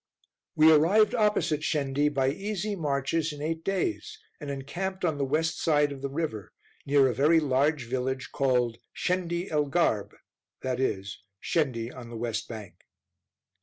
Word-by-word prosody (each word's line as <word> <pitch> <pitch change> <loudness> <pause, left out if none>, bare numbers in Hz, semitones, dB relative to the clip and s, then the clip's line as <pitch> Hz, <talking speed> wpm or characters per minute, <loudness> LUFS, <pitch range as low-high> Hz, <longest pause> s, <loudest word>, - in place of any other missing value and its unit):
We 155 +1 +7
arrived 190 +9 +5
opposite 210 -9 +1
Shendi, 145 -2 +1
by 135 -2 +1
easy 205 +4 -3
marches, 150 0 -1
in 145 - -9
eight 160 +2 -3
days, 330 - -2 0.2
and 145 -3 -7
encamped 180 +8 -4
on 155 -4 0
the - - +1
west 155 +4 0
side 150 -3 +3
of 135 -1 -7
the 140 - -3
river, 135 - -4 0.3
near 140 -1 +5
a 125 - 0
very 150 +6 +4
large 145 0 +1
village 130 +2 -3
called 125 -4 +1 0.2
"Shendi 180 0 -1
el 150 -1 +2
Garb," 140 - 0 0.5
i.e. 125 -7 -1 0.3
Shendi 125 -6 -1
on 120 -2 -9
the 115 - -7
west 110 -2 -3
bank. 105 -7 -9
145 Hz, 150 wpm, -28 LUFS, 130-165 Hz, 0.5 s, We